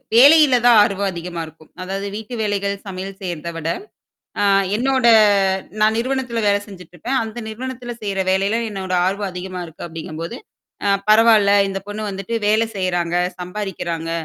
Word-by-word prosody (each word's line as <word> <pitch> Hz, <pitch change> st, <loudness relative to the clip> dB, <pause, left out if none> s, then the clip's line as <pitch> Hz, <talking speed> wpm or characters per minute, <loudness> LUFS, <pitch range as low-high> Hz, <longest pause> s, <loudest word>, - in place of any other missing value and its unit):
வேலையில 280 Hz, 0 st, +7 dB
தான் 240 Hz, -2 st, +7 dB
ஆர்வம் 200 Hz, -1 st, -1 dB
அதிகமா 170 Hz, -1 st, -6 dB
இருக்கும். 155 Hz, 0 st, -17 dB
அதாவது 195 Hz, +2 st, -4 dB
வீட்டு 220 Hz, +3 st, -6 dB
வேலைகள், 200 Hz, -1 st, -1 dB
சமையல் 190 Hz, +1 st, -7 dB
செய்றத 170 Hz, -3 st, -4 dB
விட, 165 Hz, 0 st, -3 dB, 0.7 s
அ -, -, +3 dB, 0.3 s
என்னோட 260 Hz, +1 st, +1 dB, 0.8 s
நான் 215 Hz, +1 st, +3 dB
நிறுவனத்தில 250 Hz, -2 st, -2 dB
வேலை 200 Hz, 0 st, +2 dB
செஞ்சுட்டுருப்பன். 185 Hz, -, -4 dB
அந்த 225 Hz, +2 st, -7 dB
நிறுவனத்தில 245 Hz, +1 st, -6 dB
செய்ற 200 Hz, -1 st, -2 dB
வேலையில 195 Hz, +4 st, +1 dB
என்னோட 190 Hz, -2 st, -4 dB
ஆர்வம் 200 Hz, +1 st, -2 dB
அதிகமா 180 Hz, 0 st, -6 dB
இருக்கு, 160 Hz, +1 st, -9 dB
அப்டிங்கும்போது, 165 Hz, 0 st, -7 dB, 0.5 s
அ -, -, +3 dB, 0.2 s
பரவால்ல 215 Hz, -2 st, +6 dB, 0.2 s
இந்த 195 Hz, 0 st, -4 dB
பொண்ணு 210 Hz, +1 st, -4 dB
வந்துட்டு 195 Hz, +4 st, -4 dB
வேலை 220 Hz, +2 st, +2 dB
செய்றாங்க, 175 Hz, -2 st, -1 dB, 0.2 s
சம்பாரிக்கிறாங்க. 175 Hz, -3 st, -4 dB
200 Hz, 145 wpm, -20 LUFS, 180-225 Hz, 0.8 s, வேலையில